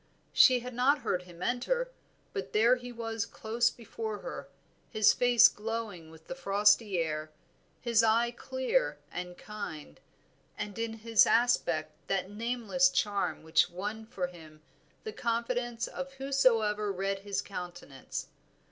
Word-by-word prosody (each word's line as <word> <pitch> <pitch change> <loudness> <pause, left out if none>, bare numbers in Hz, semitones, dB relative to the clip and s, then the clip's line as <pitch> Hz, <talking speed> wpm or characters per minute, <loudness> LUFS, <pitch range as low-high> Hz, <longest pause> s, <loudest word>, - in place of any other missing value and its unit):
She 255 -2 +6
had 250 +1 -7
not 265 +4 +3
heard 185 -6 -1
him 175 0 -10
enter, - - 0 0.4
but 405 - -5
there 230 +4 +5
he 245 0 -8
was 225 -2 -3
close 230 +1 0
before 225 -2 -6
her, - - -7 0.4
his 215 -3 +5
face 245 -1 +6
glowing 210 -6 -5
with 160 0 -16
the - - -5
frosty 205 -4 +3
air, 155 -2 -2 0.5
his 235 -2 +3
eye 230 +1 +3
clear 260 - -1
and 180 0 -6
kind, 160 - -8 0.6
and 205 +1 -5
in 230 -1 -2
his 225 0 +4
aspect 170 -10 +2 0.2
that 195 0 -1
nameless 240 +4 +1
charm 205 -9 -1
which 160 +1 +3
won 210 +5 -5
for 190 -5 -3
him 160 -3 -12 0.4
the 435 - -6
confidence 235 0 -1
of 270 0 -6
whosoever 230 -7 +2
read 195 +1 -2
his 200 0 -3
countenance. 175 -8 -7
220 Hz, 140 wpm, -30 LUFS, 195-245 Hz, 0.6 s, She